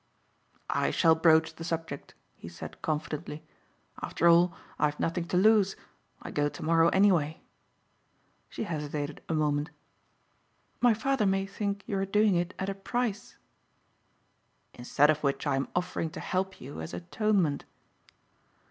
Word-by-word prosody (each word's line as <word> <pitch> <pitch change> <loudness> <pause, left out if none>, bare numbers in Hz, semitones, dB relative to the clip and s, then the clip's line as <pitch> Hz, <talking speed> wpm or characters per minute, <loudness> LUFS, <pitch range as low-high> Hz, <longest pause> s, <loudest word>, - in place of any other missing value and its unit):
"I - - +1
shall 165 -2 +4
broach 160 0 +4
the 165 - -9
subject," 165 -4 -5 0.2
he 85 - -10
said 85 0 -10
confidently, 155 0 -4 0.6
"after 170 - +1
all 170 +1 +6 0.3
I - - +4
have 150 0 -2
nothing 170 +1 -1
to 180 - -1
lose. 205 0 +4 0.5
I - - -7
go 145 0 +1
tomorrow 165 +2 +2
anyway." 175 -6 +2 1.1
She - - -5
hesitated 150 -5 -4
a 165 - +1
moment. 150 0 0 1.1
"My 240 -3 +4
father 250 -1 +1
may 195 0 +1
think 200 +1 -3
you 195 - -2
are 195 - 0
doing 210 +1 +3
it 175 +1 -1
at 190 - -3
a 195 - -1
price." 210 +1 -3 1.4
"Instead 140 +5 +3
of 155 0 -3
which 140 0 -1
I 145 -2 +1
am 135 - -1
offering 175 -2 -1
to - - -4
help 190 +1 -2
you 130 - -8
as 80 +2 -6
atonement." 170 - 0
165 Hz, 145 wpm, -29 LUFS, 150-195 Hz, 1.4 s, all